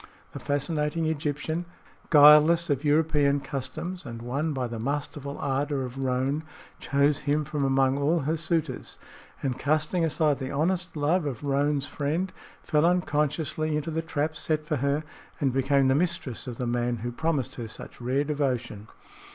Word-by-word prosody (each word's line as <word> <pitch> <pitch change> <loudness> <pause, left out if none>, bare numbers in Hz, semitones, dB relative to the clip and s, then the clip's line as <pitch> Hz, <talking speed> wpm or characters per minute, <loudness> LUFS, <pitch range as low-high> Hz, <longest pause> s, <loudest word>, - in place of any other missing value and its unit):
The - - -7
fascinating 150 +2 -1
Egyptian, 155 +2 -2 0.4
guileless 150 +2 +7
of 140 0 0
European 150 -2 +3
customs 140 +7 -5
and 115 -1 -7
won 140 +6 -1
by 130 -3 -2
the 115 -1 -6
masterful 140 +2 -3
ardor 140 0 -1
of 125 +2 -8
Roane, 130 +3 0 0.4
chose 140 +1 +2
him 150 0 0
from 150 -1 -2
among 135 0 +2
all 155 +4 +2
her 155 +4 0
suitors, 160 -4 -2 0.5
and 130 -2 -1
casting 155 +4 +1
aside 155 -3 +1
the 130 -1 -4
honest 170 +4 -1
love 150 +3 +1
of 130 -4 -5
Roane's 140 0 +1
friend, 160 +7 -2 0.3
fell 150 -1 +2
unconsciously 155 -2 +1
into 150 +2 -3
the 160 +1 -1
trap 155 -1 -2
set 155 0 -1
for - - -1
her 140 +3 0 0.4
and 135 -3 +1
became 135 +1 +3
the 130 - +4
mistress 140 -5 -1
of 120 -2 -5
the 125 - -2
man 120 0 0
who 120 - -2
promised 150 0 -1
her 120 -2 -4
such 110 - -10
rare 130 +4 +1
devotion. 130 -8 -2
145 Hz, 160 wpm, -27 LUFS, 135-155 Hz, 0.5 s, guileless